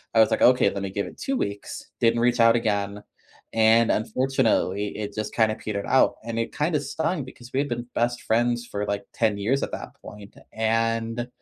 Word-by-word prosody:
I - - +5
was 110 - +5
like, - - 0
"Okay, 125 +1 +5
let 100 - -4
me 100 - -3
give 100 +1 -3
it - - -12
2 270 0 -1
weeks," 100 - -5
didn't 115 0 +3
reach 120 +1 +2
out 115 0 +6
again, 105 -3 -1 0.5
and, 115 +1 +4
unfortunately, 110 -4 0
it 105 -1 -5
just 110 -1 -4
kinda 110 -2 +3
petered 100 -2 -4
out, 130 - +4
and 115 0 -5
it 115 - -3
kinda 150 +1 +1
stung 150 +3 -2
because 125 -1 -13
we 130 - +1
had 145 0 -1
been 120 0 -3
best 120 +1 0
friends 120 +1 +1
for, 105 -3 -4
like, 100 0 -2
10 110 -3 +1
years 120 +7 0
at - - -3
that - - -7
point, 105 -1 -12 0.2
and 115 +1 0
115 Hz, 205 wpm, -25 LUFS, 105-120 Hz, 0.5 s, out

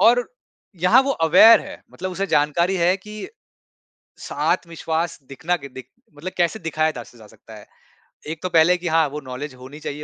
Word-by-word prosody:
और 245 +2 +4 0.6
यहाँ 215 +8 +6
वो 275 - -2 0.2
अवेयर 220 +7 +8
है - - -10
मतलब 185 - -5
उसे 195 +2 -2
जानकारी 170 +4 +1
है 180 +1 +2
कि 210 +2 -9 0.9
स - - -10
आत्मविश्वास 165 0 -2
दिखना 160 +6 -2
कि 140 -4 -10
दिक 130 -1 -11 0.3
मतलब 165 +6 -7
कैसे 175 +5 0
दिखाया 155 -2 0
दा 120 - -6
स 120 - -19
जा 110 -2 -15
सकता 110 +1 -16
है। 105 - -13 0.6
एक 155 0 -6
तो 185 - -1
पहले 165 +1 +4
कि 175 0 -6
हाँ 160 -1 +3
वो 150 - -6
नॉलेज 135 +2 -7
होनी 130 +4 -12
चाहिए 150 -1 -6
165 Hz, 190 wpm, -21 LUFS, 145-185 Hz, 0.9 s, अवेयर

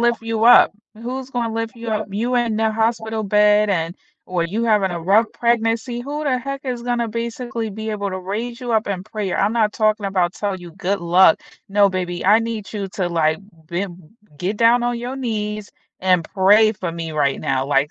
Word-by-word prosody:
lift 235 -1 +2
you 225 -1 -1
up? 240 - +7 0.2
Who's 255 +4 -6
gonna 235 -3 -2
lift 225 +1 -3
you 230 0 -7
up? 215 0 -1
You 235 +5 -1
in 235 -3 +1
the 220 0 +1
hospital 220 0 -1
bed 210 0 +4
and 165 -2 -1 0.3
or 180 -2 -1
you 210 +7 -2
having 210 -4 +2
a 170 - -4
rough 200 +7 +4
pregnancy. 235 +1 0
Who 290 +4 -4
the 275 -4 +1
heck 275 +2 -6
is 245 -2 -3
gonna 240 -1 -1
basically 230 0 -4
be 220 +2 -6
able 205 -2 -2
to 185 - -4
raise 225 +6 -5
you 245 -1 -3
up 220 -1 +2
in 190 -2 -3
prayer? 210 -3 -3
I'm 210 +4 +1
not 215 -2 +2
talking 215 -1 +1
about 185 -2 0
tell 200 -2 -2
you 175 -2 -10
good 195 +2 -2
luck. 175 0 +5 0.3
"No, 200 0 +4
baby, 180 -2 -3
I 210 +3 +7
need 225 -4 -4
you 200 -3 -4
to, 185 -1 -2
like, 160 -2 +1 0.3
bem 175 +1 -4 0.4
get 190 +6 -3
down 235 +1 +5
on 240 0 -1
your 250 +3 -5
knees 210 -4 -4 0.3
and 185 -2 +3
pray 210 +3 +4
for 180 -5 -5
me 165 -1 -5
right 140 -3 0
now, 135 0 0
like 145 +1 +2
215 Hz, 210 wpm, -20 LUFS, 190-230 Hz, 0.4 s, up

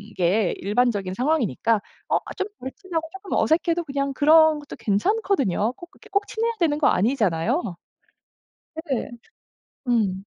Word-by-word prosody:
게 185 +2 +2
일반적인 205 -2 0
상황이니까 230 - +1 0.3
어 - - +3 0.2
좀 385 - -1
덜 260 +1 -6
친하고 335 -5 -4
쪼끔 385 0 -10
어색해도 335 +1 +2
그냥 275 -1 -2
그런 310 +2 +5
것도 290 - -10
괜찮거든요. 245 - +1
꼭 345 +4 -13
그렇게 - - -19
꼭 400 0 +1
친해야 460 +1 -1
되는 300 -4 +2
거 305 - +3
아니잖아요. 215 - +1 1.2
네 255 - -1 0.8
음. 200 -5 +1
275 Hz, 295 characters per minute, -23 LUFS, 210-330 Hz, 1.2 s, 그런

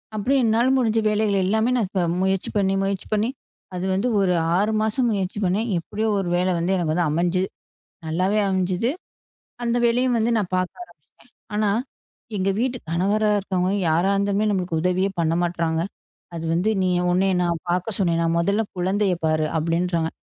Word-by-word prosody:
அப்படி 215 +6 0
என்னால 230 +2 +3
முடிஞ்ச 225 -3 +2
வேலைகள் 210 -2 +1
எல்லாமே 220 +4 +1
நான் 230 -6 +1
இப்ப 190 -2 -1 0.2
முயற்சி 190 0 0
பண்ணி, 195 -1 +2
முயற்சி 195 -1 -2
பண்ணி, 215 +2 +1 0.5
அது 180 +1 -3
வந்து 195 +6 0
ஒரு 190 -2 +2 0.2
6 210 +3 +1
மாசம் 225 +3 +1
முயற்சி 195 -2 -2
பண்ணேன். 205 +6 0
எப்படியோ 215 +6 -3
ஒரு 185 -3 -2
வேலை 180 +1 +1
வந்து 170 +3 0
எனக்கு 170 0 0
அமைஞ்சு 175 +3 +1 0.7
நல்லாவே 185 +6 +1
அமைஞ்சது. 190 +4 0 0.7
அந்த 235 0 +1
வேலையையும் 245 +1 +2
வந்து 230 +1 +1
நான் 200 -4 -2
பாக்க 185 0 -1
ஆரம்பிச்சிட்டேன். - - -23 0.2
ஆனா 210 -1 +2 0.7
எங்க 190 0 0
வீட்டு 250 +1 0
கணவரா 200 +5 +1
இருக்கவங்க, 185 -1 -1 0.2
யாரா 170 +5 +2
இருந்தாலுமே 200 +1 +1
நம்மளுக்கு 180 -4 -1
உதவியே 180 +2 +1
பண்ண 165 -1 +1
மாட்றாங்க. 170 -2 -1 0.5
அது 165 -1 -5
வந்து, 180 +5 +1
"நீ 185 - +1 0.2
உன்னைய 190 +2 +2
நான் 170 -2 -1
பார்க்கச் 185 +4 -1
சொன்னேனா? 170 -3 +1
முதல்ல 200 +6 +1
குழந்தைய 190 +2 +1
பாரு." 155 -1 +2
அப்படின்றாங்க. 165 0 0
190 Hz, 160 wpm, -23 LUFS, 175-215 Hz, 0.7 s, என்னால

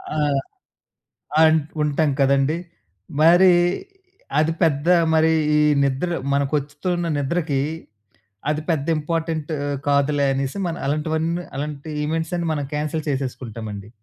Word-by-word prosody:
ఆ! - - -1 1.3
ఆన్ 160 0 +6 0.2
ఉంటాం 150 +1 +1
కదండీ. 140 +3 +3 0.6
మరి 175 +4 +7 0.9
అది 155 +1 +3
పెద్ద 150 -1 +2 0.3
మరి 160 0 +4 0.2
ఈ - - +4 0.2
నిద్ర 140 +6 0 0.2
మనకొస్తుతున్న 145 +5 -1
నిద్రకి, 145 -1 0 0.9
అది 155 +1 0
పెద్ద 155 -4 0
ఇంపార్టెంట్ 160 0 -2 0.4
కాదులే 140 0 +2
అనేసి, 135 +4 -2
మనం 170 - -4
అలాంటివన్నీ 160 +3 -1
అలాంటి 150 +1 -5
ఈవెంట్సన్నీ 165 +2 -2
మనం 145 -2 -2
క్యాన్సిల్ 155 +1 -2
చేసేసుకుంటామండి. 115 -6 -5
150 Hz, 105 wpm, -22 LUFS, 140-160 Hz, 1.3 s, మరి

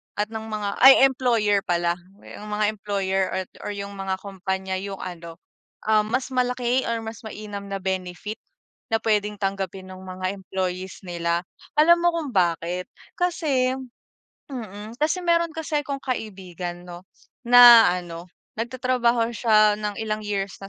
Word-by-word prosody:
at 210 +2 -2
ng 220 0 -6
mga 210 -2 -3
ay 265 +1 +9
employer 235 -6 +3
pala, 175 -1 +1 0.3
yung 210 - -10
mga 210 0 0
employer 195 -2 -1 0.2
at - - -23
or 205 - -4
yung 200 0 -6
mga 190 -1 -1
kompanya 190 -1 -3
yung 195 0 -6
ano 170 -2 -8 0.5
ah, 215 0 +4
mas 255 +5 -2
malaki 250 0 +1
or 230 -1 -2
mas 220 0 -7
mainam 205 -2 -7
na 195 - -4
benefit 190 +2 -4 0.5
na 225 - +2
pwedeng 210 -1 +1
tanggapin 195 -1 -3
ng 185 0 -10
mga 185 +1 -4
employees 185 -1 -4
nila. 170 -1 -1 0.4
Alam 340 +3 +7
mo 345 - +5
kung 305 -6 -3
bakit 175 0 0 0.3
kasi 305 -8 +1 0.8
mm 215 -4 -7
kasi 315 +5 +1
meron 335 0 +3
kasi 310 -2 -1
akong 275 -1 -4
kaibigan 185 -7 -5
'no, 175 -1 -9 0.4
na 240 -3 +9
ano, 175 0 -9 0.3
nagtatrabaho 240 -1 +1
siya 215 -2 +4
ng 210 -1 -3
ilang 215 -1 -2
years 200 -2 -2
na 195 - -7
210 Hz, 150 wpm, -24 LUFS, 190-240 Hz, 0.8 s, ay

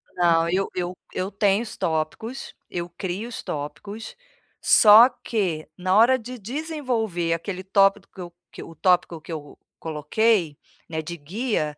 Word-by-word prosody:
Não, 165 -2 +3
eu 190 +3 0
eu 180 0 -3 0.2
eu 185 +2 -3
tenho 200 +1 +2
os 225 - -8
tópicos, 160 - -3 0.2
eu 175 -1 -4
crio 190 +6 -5
os 245 - -6
tópicos, 155 +10 -6 0.5
só 220 +3 +8
que 190 -11 -3
na 185 +1 0
hora 235 +5 +6
de 250 +2 -8
desenvolver 235 - -2
aquele 185 +3 -4
tópico 195 +1 +3
que 190 - -9
eu 175 -1 -9 0.2
que - - -10
eu - - -10
o 165 - -13
tópico 175 -2 +2
que 155 - -11
eu 150 -3 -7 0.2
coloquei, 165 +2 0 0.3
né, 160 -1 -3
de 170 +2 -7
guia, 160 - -2
185 Hz, 160 wpm, -24 LUFS, 165-220 Hz, 0.5 s, só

